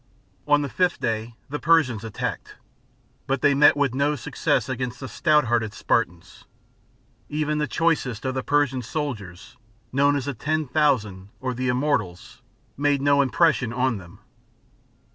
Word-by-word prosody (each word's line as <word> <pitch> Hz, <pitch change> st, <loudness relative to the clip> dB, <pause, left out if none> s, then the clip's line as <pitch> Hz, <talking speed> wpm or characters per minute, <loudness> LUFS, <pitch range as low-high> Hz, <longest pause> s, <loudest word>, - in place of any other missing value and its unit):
On 145 Hz, 0 st, +4 dB
the -, -, -2 dB
fifth 180 Hz, +6 st, 0 dB
day 115 Hz, -1 st, -3 dB
the 150 Hz, +2 st, -4 dB
Persians 150 Hz, -10 st, +2 dB
attacked, 110 Hz, -2 st, -5 dB, 0.7 s
but 135 Hz, -1 st, -1 dB
they 145 Hz, -, +5 dB
met 145 Hz, +1 st, +5 dB
with 140 Hz, -4 st, +1 dB
no 140 Hz, +3 st, +1 dB
success, 145 Hz, -2 st, -1 dB
against 125 Hz, -1 st, -4 dB
the 130 Hz, -, -6 dB
stout 150 Hz, +3 st, +2 dB
hearted 115 Hz, -2 st, 0 dB
Spartans. 90 Hz, -7 st, -2 dB, 0.8 s
Even 150 Hz, 0 st, -1 dB
the 150 Hz, -, 0 dB
choicest 145 Hz, -8 st, 0 dB
of 130 Hz, -, -1 dB
the 130 Hz, -, -2 dB
Persian, 145 Hz, -2 st, +1 dB
soldiers, 110 Hz, -, -6 dB, 0.3 s
known 140 Hz, +2 st, +3 dB
as 140 Hz, -3 st, -2 dB
the 140 Hz, -, -3 dB
Ten 155 Hz, +5 st, -1 dB
Thousand 120 Hz, -10 st, 0 dB
or 130 Hz, -1 st, -3 dB
the 130 Hz, +1 st, -3 dB
Immortals, 125 Hz, -9 st, -2 dB, 0.3 s
made 145 Hz, 0 st, +1 dB
no 140 Hz, +1 st, +3 dB
impression 140 Hz, -3 st, +2 dB
on 125 Hz, -2 st, 0 dB
them. 90 Hz, -2 st, -14 dB
130 Hz, 150 wpm, -24 LUFS, 115-145 Hz, 0.8 s, they